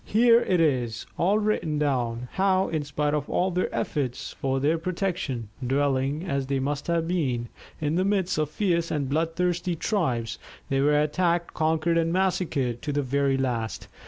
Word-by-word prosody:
Here 235 Hz, +2 st, +5 dB
it 180 Hz, -2 st, +1 dB
is, 125 Hz, -8 st, +1 dB
all 195 Hz, +5 st, +2 dB
written 210 Hz, -8 st, 0 dB
down, 125 Hz, -5 st, -1 dB
how, 190 Hz, 0 st, +2 dB
in 155 Hz, -2 st, -1 dB
spite 145 Hz, 0 st, -1 dB
of 150 Hz, -2 st, -1 dB
all 185 Hz, +1 st, +1 dB
their 180 Hz, +1 st, 0 dB
efforts 130 Hz, -5 st, -2 dB
for 135 Hz, 0 st, -1 dB
their 155 Hz, +4 st, +2 dB
protection, 170 Hz, -, -2 dB
dwelling, 135 Hz, +3 st, 0 dB
as 140 Hz, -6 st, -1 dB
they 140 Hz, 0 st, 0 dB
must 140 Hz, +1 st, -2 dB
have 165 Hz, -1 st, +1 dB
been, 130 Hz, -10 st, -1 dB, 0.3 s
in 150 Hz, 0 st, -1 dB
the 185 Hz, -, +2 dB
midst 190 Hz, -4 st, +1 dB
of 155 Hz, -1 st, 0 dB
fierce 170 Hz, -1 st, 0 dB
and 145 Hz, -3 st, -1 dB
bloodthirsty 170 Hz, +4 st, 0 dB
tribes, 125 Hz, -, -1 dB, 0.3 s
they 135 Hz, 0 st, +1 dB
were 150 Hz, +1 st, +4 dB
attacked, 170 Hz, +3 st, +1 dB
conquered, 160 Hz, +1 st, +1 dB
and 165 Hz, 0 st, +1 dB
massacred 170 Hz, -10 st, 0 dB
to 150 Hz, -, -3 dB
the 145 Hz, 0 st, 0 dB
very 135 Hz, +1 st, +1 dB
last. 120 Hz, -4 st, -2 dB
150 Hz, 170 wpm, -26 LUFS, 135-175 Hz, 0.3 s, Here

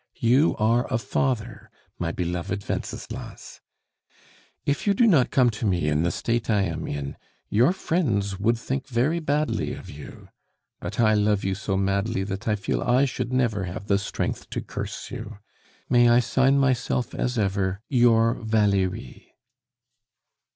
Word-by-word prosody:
You 130 Hz, +7 st, +3 dB
are 115 Hz, +4 st, +1 dB
a 130 Hz, -, +2 dB
father, 115 Hz, -2 st, -2 dB, 0.3 s
my 85 Hz, -1 st, -1 dB
beloved 90 Hz, +3 st, -3 dB
Wenceslas. -, -, -6 dB, 1.0 s
"If 140 Hz, +7 st, -1 dB
you 200 Hz, -, +4 dB
do 240 Hz, -, +4 dB
not 160 Hz, -, +4 dB
come 125 Hz, -3 st, +3 dB
to 110 Hz, 0 st, -3 dB
me 90 Hz, -6 st, +1 dB
in 75 Hz, +1 st, +1 dB
the 85 Hz, -, +1 dB
state 115 Hz, +5 st, -2 dB
I 105 Hz, -3 st, +3 dB
am 85 Hz, -3 st, -3 dB
in, 70 Hz, -1 st, -5 dB, 0.3 s
your 120 Hz, +10 st, +4 dB
friends 105 Hz, -, -1 dB
would 115 Hz, +3 st, +2 dB
think 135 Hz, +3 st, -4 dB
very 135 Hz, +7 st, +1 dB
badly 150 Hz, -1 st, -1 dB
of -, -, -10 dB
you. 75 Hz, 0 st, -11 dB, 0.5 s
But -, -, -6 dB
I 110 Hz, -2 st, +5 dB
love 105 Hz, -1 st, +2 dB
you 95 Hz, -, 0 dB
so 95 Hz, 0 st, -2 dB
madly, 100 Hz, +1 st, 0 dB
that 95 Hz, +3 st, -5 dB
I 105 Hz, -, +2 dB
feel 100 Hz, -2 st, -2 dB
I 125 Hz, +3 st, +3 dB
should 125 Hz, -2 st, -3 dB
never 115 Hz, -6 st, +1 dB
have 95 Hz, +3 st, -6 dB
the 100 Hz, -1 st, +2 dB
strength 100 Hz, -, -4 dB
to -, -, -3 dB
curse -, -, -6 dB
you. 110 Hz, -1 st, -7 dB, 0.5 s
May 120 Hz, -1 st, +5 dB
I 120 Hz, +1 st, +6 dB
sign 135 Hz, +3 st, +3 dB
myself 130 Hz, -2 st, 0 dB
as 125 Hz, 0 st, -2 dB
ever, 95 Hz, -1 st, 0 dB
"YOUR 115 Hz, -3 st, +4 dB
VALERIE." 105 Hz, -5 st, -1 dB
110 Hz, 160 wpm, -25 LUFS, 100-125 Hz, 1.0 s, I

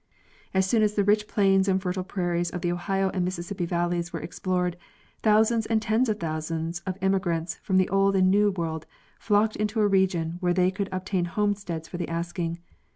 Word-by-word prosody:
As 190 Hz, 0 st, +2 dB
soon 220 Hz, +4 st, +2 dB
as 210 Hz, 0 st, +2 dB
the 205 Hz, -, +3 dB
rich 210 Hz, +1 st, +2 dB
plains 195 Hz, -1 st, +3 dB
and 190 Hz, -1 st, +2 dB
fertile 185 Hz, 0 st, -2 dB
prairies 175 Hz, -2 st, -1 dB
of 175 Hz, -, -5 dB
the 175 Hz, -1 st, 0 dB
Ohio 190 Hz, +2 st, 0 dB
and 185 Hz, -, -1 dB
Mississippi 180 Hz, 0 st, -3 dB
valleys 175 Hz, 0 st, -1 dB
were -, -, -4 dB
ex -, -, -8 dB
plored, 180 Hz, -1 st, 0 dB, 0.5 s
thousands 220 Hz, +1 st, +3 dB
and 225 Hz, -1 st, +2 dB
tens 220 Hz, +3 st, +1 dB
of 215 Hz, -, -1 dB
thousands 165 Hz, +1 st, -3 dB
of 185 Hz, 0 st, -2 dB
emigrants 175 Hz, -4 st, 0 dB
from 190 Hz, -, +1 dB
the 185 Hz, -, +4 dB
Old 195 Hz, 0 st, +3 dB
and 185 Hz, -1 st, +4 dB
New 205 Hz, +1 st, +4 dB
World 165 Hz, -4 st, -4 dB, 0.3 s
flocked 215 Hz, 0 st, +2 dB
into 215 Hz, +1 st, -1 dB
a 210 Hz, -, +4 dB
region 180 Hz, -4 st, +1 dB
where 175 Hz, -1 st, +1 dB
they 185 Hz, 0 st, +3 dB
could 195 Hz, 0 st, -4 dB
ob 185 Hz, 0 st, -4 dB
tain 185 Hz, -3 st, 0 dB
homesteads 195 Hz, -4 st, -2 dB
for 175 Hz, -, -6 dB
the 175 Hz, -, -4 dB
asking. 170 Hz, 0 st, -3 dB
185 Hz, 205 wpm, -26 LUFS, 175-205 Hz, 0.5 s, the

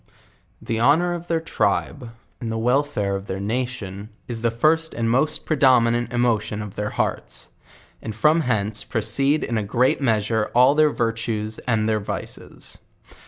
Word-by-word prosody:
The 115 Hz, -1 st, -3 dB
honor 160 Hz, +8 st, +3 dB
of 175 Hz, 0 st, -6 dB
their 165 Hz, -1 st, +1 dB
tribe, 145 Hz, -5 st, -1 dB, 0.3 s
and 115 Hz, -2 st, -4 dB
the 115 Hz, -, -2 dB
wellfare 120 Hz, -4 st, 0 dB
of 100 Hz, +1 st, -6 dB
their 95 Hz, -, -4 dB
nation, 105 Hz, -2 st, -4 dB, 0.2 s
is 115 Hz, -2 st, -3 dB
the 115 Hz, -, +2 dB
firdt 155 Hz, +8 st, +1 dB
and 115 Hz, -1 st, 0 dB
most 145 Hz, +5 st, 0 dB
predominant 120 Hz, -5 st, +3 dB
emotion 110 Hz, -3 st, 0 dB
of 105 Hz, -2 st, -8 dB
their 105 Hz, 0 st, -3 dB
hearts; -, -, -3 dB, 0.5 s
nnd 110 Hz, -2 st, -5 dB
from 150 Hz, +8 st, +3 dB
hence 110 Hz, -5 st, -1 dB
proceed 135 Hz, +6 st, 0 dB
in 115 Hz, -2 st, -1 dB
a -, -, -2 dB
great 125 Hz, +7 st, +1 dB
measure 110 Hz, -3 st, +1 dB
all 125 Hz, +3 st, +6 dB
their 155 Hz, 0 st, +4 dB
virtues 115 Hz, -3 st, -2 dB
and 110 Hz, -3 st, +1 dB
their 110 Hz, -1 st, +1 dB
vices. 100 Hz, -, -8 dB
115 Hz, 160 wpm, -22 LUFS, 110-135 Hz, 0.5 s, all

